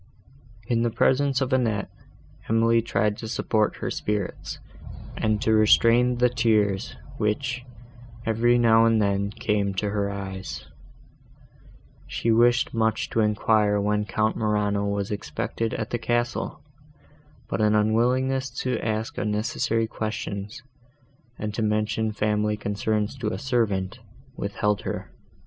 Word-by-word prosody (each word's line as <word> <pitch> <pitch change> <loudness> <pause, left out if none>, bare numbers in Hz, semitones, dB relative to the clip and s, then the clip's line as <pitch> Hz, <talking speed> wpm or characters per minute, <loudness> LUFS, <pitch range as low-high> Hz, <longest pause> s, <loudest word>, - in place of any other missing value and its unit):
In 115 0 +1
the 120 - +2
presence 135 +3 +2
of 130 0 0
Annette, 115 -6 0 0.6
Emily 115 +1 +3
tried 105 -2 0
to 110 - -6
support 110 -1 0
her - - -4
spirits, 105 -3 -3 0.6
and 110 -1 0
to 110 - +3
restrain 115 +3 +5
the 125 +1 +4
tears, 105 -5 +1 0.2
which, 125 +4 -1 0.6
every 115 +2 +3
now 115 -1 +5
and 115 -1 +3
then, 100 -1 +1
came 100 -1 -1
to 100 +2 -1
her 100 -1 -1
eyes. 95 -9 -6 1.4
She 115 - -1
wished 120 +2 +3
much 110 -1 0
to - - 0
enquire 105 -1 +2
when 105 +1 0
Count 110 +1 0
Morano 105 -2 0
was 100 +1 -2
expected 110 +2 -3
at 110 -1 -4
the 120 - -1
castle, 120 0 -2 0.8
but - - -2
an 105 0 +3
unwillingness 125 +5 +2
to 125 -3 -1
ask 110 0 -2
unnecessary 110 +2 0
questions, 105 +1 -5 0.7
and 105 0 -4
to 115 - -2
mention 110 +1 0
family 105 0 0
concerns 105 +2 -1
to 115 - -2
a 110 - -2
servant, 115 -6 -1 0.4
withheld 105 0 -1
her. - - -5
110 Hz, 130 wpm, -25 LUFS, 105-115 Hz, 1.4 s, restrain